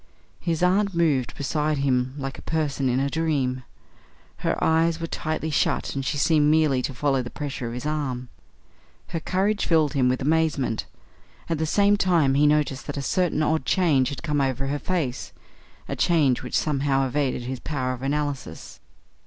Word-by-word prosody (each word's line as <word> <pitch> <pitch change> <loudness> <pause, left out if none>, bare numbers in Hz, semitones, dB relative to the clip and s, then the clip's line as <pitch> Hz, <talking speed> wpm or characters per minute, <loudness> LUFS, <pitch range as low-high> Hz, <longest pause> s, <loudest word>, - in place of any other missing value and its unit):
His 170 0 -1
aunt 195 +1 +2
moved 150 -7 +1
beside 150 +1 0
him 130 -1 0
like 135 -1 -5
a - - -9
person 145 -4 -1
in 125 +1 +1
a 135 - +1
dream. 140 -5 -1 0.8
Her - - -1
eyes 160 +1 +2
were 165 - -3
tightly 155 -1 -3
shut, 150 - 0
and 135 - -3
she 145 - -2
seemed 150 +1 +3
merely 155 -4 +3
to 135 - -3
follow 135 -1 +1
the 120 - -6
pressure 140 -4 -5
of 115 - -5
his 125 - -6
arm. 135 -5 -2 0.8
Her 165 - -2
courage 195 +5 0
filled 155 -4 +3
him 130 -3 +2
with 130 - 0
amazement. 150 -5 0 0.6
At 165 -2 -1
the 160 - 0
same 205 +4 +3
time 170 -8 +3
he 145 +2 +4
noticed 150 -3 +1
that - - -4
a 140 - -3
certain 170 -1 +1
odd 160 +1 +1
change 145 -9 +2
had 140 - -7
come 150 -3 0
over 135 0 -1
her 145 +2 -2
face, 150 -10 -3 0.5
a - - -3
change 150 -8 +2
which 125 - -2
somehow 140 -2 +1
evaded 135 -2 -1
his 130 +1 -5
power 130 -3 -2
of 125 - -8
analysis. 145 0 -3
145 Hz, 180 wpm, -24 LUFS, 135-160 Hz, 0.8 s, he